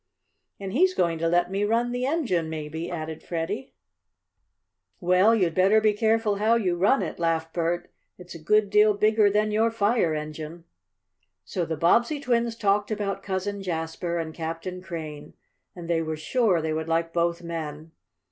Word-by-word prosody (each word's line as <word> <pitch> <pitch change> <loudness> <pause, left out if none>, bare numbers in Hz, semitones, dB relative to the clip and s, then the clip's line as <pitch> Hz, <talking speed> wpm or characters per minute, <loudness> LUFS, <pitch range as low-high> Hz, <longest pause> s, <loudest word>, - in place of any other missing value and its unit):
"And 195 -1 -6
he's 370 +6 +3
going 170 -2 +1
to 165 - 0
let 175 +1 +2
me 200 +1 0
run 230 +3 +1
the 250 +1 -1
engine 230 - 0
maybe," 160 +2 -5
added 160 -2 -5
Freddie. 185 +10 -4 1.2
"Well, 185 +4 +4
you'd 180 -6 +1
better 195 +5 +4
be 215 -1 +3
careful 220 -1 +1
how 220 +3 +3
you 190 -6 +1
run 200 +10 +3
it," - - -5
laughed 165 -1 -1
Bert. 175 +1 -2 0.2
"It's 180 0 -11
a 165 - -10
good 210 +4 +2
deal 210 0 +5
bigger 215 0 +4
than 210 +1 +1
your 220 +2 +2
fire 210 -6 +1
engine." 155 +2 -6 0.8
So 175 - -2
the 160 -1 -3
Bobbsey 235 - +3
twins 235 -3 0
talked 205 -2 +1
about 205 -2 -2
Cousin 200 +1 -3
Jasper 170 -1 -3
and 160 -1 -4
Captain 165 +3 -5
Crane, 155 -5 -7 0.4
and 175 -2 -8
they 165 -1 +1
were 160 -1 -3
sure 180 +1 +1
they 160 -1 -1
would 160 0 -3
like 165 0 0
both 170 0 0
men. 160 -2 -6
180 Hz, 170 wpm, -25 LUFS, 165-215 Hz, 1.2 s, deal